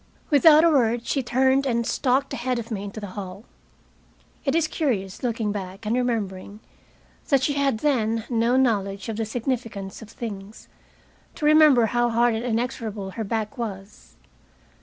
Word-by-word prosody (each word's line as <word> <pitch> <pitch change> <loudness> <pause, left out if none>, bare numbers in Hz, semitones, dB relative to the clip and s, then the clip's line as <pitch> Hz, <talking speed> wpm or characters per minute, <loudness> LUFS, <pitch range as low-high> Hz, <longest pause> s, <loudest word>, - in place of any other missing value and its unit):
Without 300 +2 +7
a 335 - +6
word 235 -4 +2
she 275 - 0
turned 265 +2 +2
and 235 -2 0
stalked 265 +3 0
ahead 250 +1 -2
of 235 0 -6
me 200 -2 -3
into 205 +2 -7
the 205 -3 -7
hall. 195 0 -7 1.0
It 275 - +1
is 330 -1 +2
curious, 220 - -2
looking 230 -4 -1
back 195 0 -6
and 220 +3 0
remembering 210 -5 -2 0.7
that 275 -2 +3
she 285 - +1
had 275 -5 0
then 230 -6 +1
no 235 +1 +1
knowledge 200 -5 0
of 220 - -4
the 225 - -1
significance 225 -4 -4
of 220 - -11
things, 210 -3 -8 0.7
to 300 - -4
remember 300 -6 +6
how 240 +2 +1
hard 235 +1 +2
and 220 +1 -3
inexorable 225 -4 -3
her 220 +4 -4
back 220 +4 -3
was. 200 -3 -7
230 Hz, 160 wpm, -24 LUFS, 210-260 Hz, 1.0 s, Without